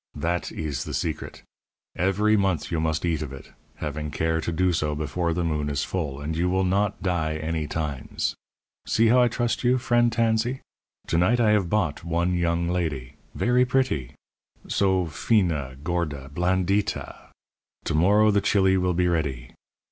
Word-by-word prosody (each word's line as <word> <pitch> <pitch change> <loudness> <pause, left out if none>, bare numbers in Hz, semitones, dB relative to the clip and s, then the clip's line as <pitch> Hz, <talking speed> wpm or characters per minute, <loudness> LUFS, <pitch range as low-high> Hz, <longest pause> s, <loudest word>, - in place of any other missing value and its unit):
That 85 +1 -2
ees 75 -5 -3
the - - -4
secret. 80 -3 -4 0.5
Everee 105 +4 +2
month 95 -6 0
you 80 - 0
must 80 +1 0
eat 80 -3 0
of 75 -3 -5
it, 65 - -11 0.2
having 75 0 -4
care 80 +2 0
to 85 - -2
do 90 +2 +1
so 75 -2 0
before 80 +3 -1
the 85 +1 -1
moon 75 -3 -1
is 70 - -1
full, 75 -7 -3
and 75 +3 -4
you 90 +2 +1
will 95 +1 +1
not 100 +2 0
die 80 -4 0
any 80 0 -2
times. 75 -5 -3 0.5
See 115 0 +3
how 125 +2 +5
I 120 - +5
trust 120 +1 -1
you, 125 +1 +4
friend 120 -1 +2
Tansee! 115 +2 +1 0.4
To 85 - +1
night 110 +8 +3
I 110 -3 +4
have 100 -5 +2
bought 90 -8 0
one 85 +2 0
young 85 -1 0
ladee 80 -8 -2 0.2
verree 125 +1 +3
pretty 125 - 0 0.5
so 95 -2 +2
fina, 80 - 0
gorda, 75 -5 -3
blandita! 95 +4 -1 0.6
To - - -1
morrow 105 +7 +4
the 100 0 +2
chili 95 -2 +3
will 90 -1 +1
be 90 0 +2
ready. 70 -8 -2
85 Hz, 170 wpm, -25 LUFS, 80-100 Hz, 0.6 s, how